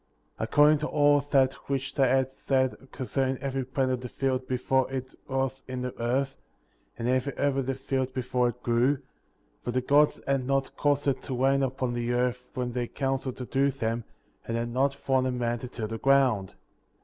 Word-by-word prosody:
According 150 +1 +5
to 150 - -2
all 145 -1 +4
that 135 -2 +3 0.2
which 135 0 -1
they 135 -2 +3
had 130 0 +2
said 130 -1 +1 0.2
con 130 - -5
cerning 130 0 0
every 135 0 -2
plant 130 0 0
of 125 -1 -1
the 125 - -6
field 130 0 -1
before 130 +1 +1
it 130 -1 -4
was 135 0 -1
in 130 -1 -4
the 125 - -3
earth, 135 +3 0 0.6
and 115 - -2
every 130 +2 +1
herb 140 -1 +1
of 135 -2 -1
the 135 - 0
field 130 0 -2
before 125 -1 0
it 125 +1 -9
grew; 120 +4 +3 0.7
for - - -4
the 125 +1 +1
Gods 145 +4 +3
had 135 -2 0
not 135 -1 0
caused 145 -1 +1
it 135 -2 +1
to 130 - -4
rain 135 +1 +3
upon 130 -2 -1
the 120 0 -1
earth 125 0 -1
when 125 -1 -2
they 120 0 -2
counseled 135 -1 -2
to 125 - -5
do 135 +3 +2
them, 115 -3 -2 0.4
and 115 - -1
had 120 0 -2
not 135 +3 +1
formed 130 -2 +1
a - - 0
man 120 -1 -1
to 125 - -6
till 115 -3 -5
the 115 +1 -5
ground. 130 -8 +3
130 Hz, 205 wpm, -28 LUFS, 125-135 Hz, 0.7 s, According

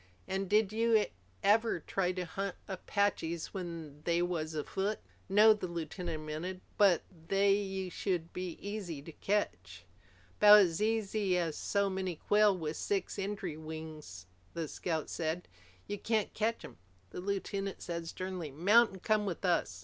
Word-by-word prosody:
An' 195 +1 -1
did 210 +1 +3
you 225 -1 +4 0.4
ever 220 -1 +4
try 180 +3 0
to 180 -1 -3
hunt 195 +3 -3
Apaches 190 -4 -1
when 165 -6 -6
they 170 +1 +2
was 160 -3 -2
afoot?" 195 +7 -1 0.3
"No," 210 +3 +7
the 205 -3 -4
lieutenant 170 -1 -4
admitted. 160 +5 -5
"But 195 -5 +5 0.2
they 195 -1 +2
should 175 -2 -2
be 180 -2 -4
easy 195 -8 -5
to 165 - -9
catch." 90 - -2 0.5
"'Bout 210 0 +10
as 180 -3 +3
easy 215 -3 +1
as 165 -3 -1
so 200 -1 +1
many 190 -2 -2
quail 205 +3 +3
with 160 -2 -3
six 200 0 -2
extry 195 -4 -3
wings," 155 - -8 0.3
the 165 -2 -2
scout 160 0 -2
said. 165 +2 -3 0.4
"You 205 - -4
can't 220 -2 0
catch 225 +2 -1
'em." - - -12 0.3
The - - -6
lieutenant 195 0 -3
said 170 -1 -4
sternly, 185 -2 -4
"Mount 205 - +5
and 190 - -11
come 215 -1 +2
with 185 +1 -3
us." 165 - +1
185 Hz, 150 wpm, -33 LUFS, 165-205 Hz, 0.5 s, Bout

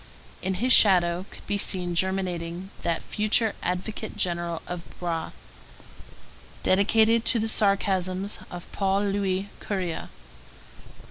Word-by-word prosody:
In 190 0 -1
his 245 +7 +3
shadow 180 -2 +5
could - - -13
be 205 - -1
seen 180 -3 +1
germinating 180 0 -2
that 165 -1 -1
future 215 +1 +1
advocate 195 +5 -4
general 170 -2 -2
of 175 -1 -5 0.2
Broë, 170 -2 -3 1.3
dedicated 220 +4 +4
to 240 - +3
the 220 0 0
sarcasms 195 -2 +1
of 175 -1 -8
Paul 195 0 +1
Louis 195 -1 -1
Courier. 185 -5 -3
190 Hz, 115 wpm, -26 LUFS, 175-205 Hz, 1.3 s, shadow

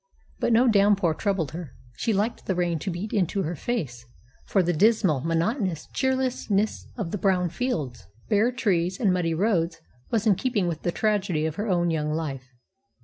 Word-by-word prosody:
But - - +1
no 235 +3 +5
downpour 200 -5 +4
troubled 185 -6 -1
her. 165 -5 -8 0.2
She 230 - -1
liked 210 +3 -1
the 190 - 0
rain 175 -2 0
to 195 - -4
beat 185 +5 -4
into 195 0 +1
her 165 +3 -3
face, 145 - -3 0.4
for 195 - +3
the 175 +1 +1
dismal, 190 - +3
monotonous 165 - -1
cheerlessness 255 -6 0
of 195 -8 -3
the 205 - -3
brown 180 -1 +2
fields, 150 - -3 0.2
bare 220 +3 +3
trees, 190 -6 0
and 200 -6 +3
muddy 165 -3 0
roads 170 -4 +1 0.3
was 225 -2 0
in 215 - +6
keeping 215 -1 0
with 160 -2 -3
the 175 - 0
tragedy 195 -6 0
of 160 +2 -3
her 210 +2 -2
own 175 -2 +2
young 150 -1 -1
life. 140 -5 -4
185 Hz, 180 wpm, -25 LUFS, 165-215 Hz, 0.4 s, in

